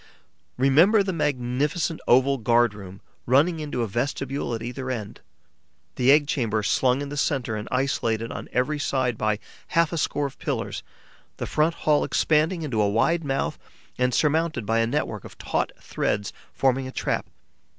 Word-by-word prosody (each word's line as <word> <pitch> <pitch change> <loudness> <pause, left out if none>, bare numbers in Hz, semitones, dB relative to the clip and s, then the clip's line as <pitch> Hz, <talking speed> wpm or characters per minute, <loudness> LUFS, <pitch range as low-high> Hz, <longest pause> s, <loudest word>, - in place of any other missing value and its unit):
Remember 160 - +5
the 190 -1 -2
magnificent 150 +2 -1
oval 130 +2 +4
guard 120 0 +3
room, 95 -2 -10 0.3
running 155 +7 +3
into 145 -5 -2
a - - -1
vestibule 135 +3 -2
at 115 - -6
either 130 +2 -5
end; 110 -5 -5 0.7
the 130 +2 +4
egg 145 +1 +5
chamber 115 -7 0
slung 130 +6 +2
in 140 - -6
the 145 - -5
centre 135 -6 0
and 105 0 -5
isolated 115 -4 -1
on - - -7
every 145 +4 0
side 130 -4 0
by 110 -1 0 0.3
half 170 0 +2
a 165 - -1
score 145 -1 0
of 135 - -7
pillars; - - -3 0.6
the - - -3
front 155 +2 +1
hall 150 -1 +4
expanding 160 +3 +1
into 120 -8 0
a 100 - +3
wide 165 +11 +2
mouth 135 -2 -2 0.4
and 125 0 +2
surmounted 155 -5 +1
by 115 +2 +1
a 115 - +2
network 115 -5 -2
of - - -12
taut - - -1
threads 100 -1 -2 0.2
forming 130 0 +1
a - - -7
trap. - - -2
130 Hz, 170 wpm, -25 LUFS, 115-150 Hz, 0.7 s, Remember